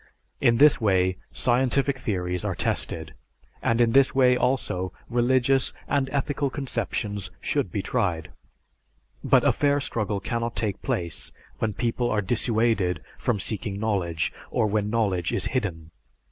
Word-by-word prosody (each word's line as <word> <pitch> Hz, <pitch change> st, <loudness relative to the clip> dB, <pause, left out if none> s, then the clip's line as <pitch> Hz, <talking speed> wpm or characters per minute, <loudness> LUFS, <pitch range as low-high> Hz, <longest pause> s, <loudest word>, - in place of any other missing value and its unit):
It 115 Hz, -, +4 dB
is -, -, -2 dB
this 150 Hz, -3 st, +6 dB
way 95 Hz, -3 st, +2 dB
scientific 130 Hz, +2 st, +1 dB
theories 90 Hz, -6 st, -2 dB
are -, -, -2 dB
tested, -, -, -2 dB, 0.5 s
and 115 Hz, 0 st, +1 dB
in 120 Hz, -1 st, +4 dB
this 135 Hz, +2 st, +4 dB
way 125 Hz, -2 st, +5 dB
also, 105 Hz, -8 st, 0 dB, 0.2 s
religious 130 Hz, +2 st, +3 dB
and 135 Hz, -2 st, +1 dB
ethical 140 Hz, 0 st, 0 dB
conceptions 110 Hz, -7 st, -3 dB
should 90 Hz, -, -1 dB
be 100 Hz, -, -2 dB
tried. 90 Hz, -11 st, -1 dB, 0.9 s
But -, -, +4 dB
a -, -, +5 dB
fair 145 Hz, 0 st, +2 dB
struggle 105 Hz, -6 st, -2 dB
cannot 115 Hz, +1 st, -3 dB
take 105 Hz, -4 st, -2 dB
place 85 Hz, -3 st, -3 dB, 0.3 s
when 110 Hz, -1 st, 0 dB
people 120 Hz, 0 st, 0 dB
are 105 Hz, -, +1 dB
dissuaded 110 Hz, -5 st, 0 dB, 0.2 s
from 115 Hz, -4 st, 0 dB
seeking 100 Hz, -1 st, -3 dB
knowledge, 90 Hz, -7 st, -1 dB, 0.2 s
or -, -, +1 dB
when 105 Hz, 0 st, 0 dB
knowledge 100 Hz, -6 st, 0 dB
is -, -, 0 dB
hidden." 85 Hz, -10 st, -2 dB
115 Hz, 145 wpm, -25 LUFS, 95-125 Hz, 0.9 s, this